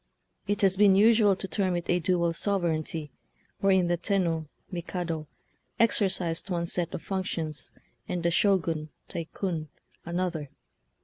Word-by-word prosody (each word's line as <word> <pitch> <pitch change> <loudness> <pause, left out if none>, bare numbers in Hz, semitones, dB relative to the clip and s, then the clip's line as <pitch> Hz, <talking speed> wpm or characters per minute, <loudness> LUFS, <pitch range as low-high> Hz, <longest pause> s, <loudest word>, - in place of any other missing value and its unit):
It 205 0 0
has 195 -1 +3
been 200 -2 +6
usual 215 -1 +6
to 190 - -5
term 185 0 0
it 175 -1 -3
a 180 - +2
"dual 170 -1 +1
sovereignty," 165 -5 -1 0.5
wherein 190 -2 +4
the 175 0 +1
Tenno 170 -4 0 0.2
{Mikado) 170 -3 -3 0.5
exercised 190 -6 +1
one 170 -2 0
set 170 0 -1
of - - -6
functions, 165 -7 -2 0.4
and 175 -1 -2
the 170 - +2
Shogun 165 -5 +2 0.2
(TaiJcun) 170 -1 -3 0.4
an 170 +1 -2
other. 165 -6 -2
175 Hz, 135 wpm, -28 LUFS, 165-195 Hz, 0.5 s, been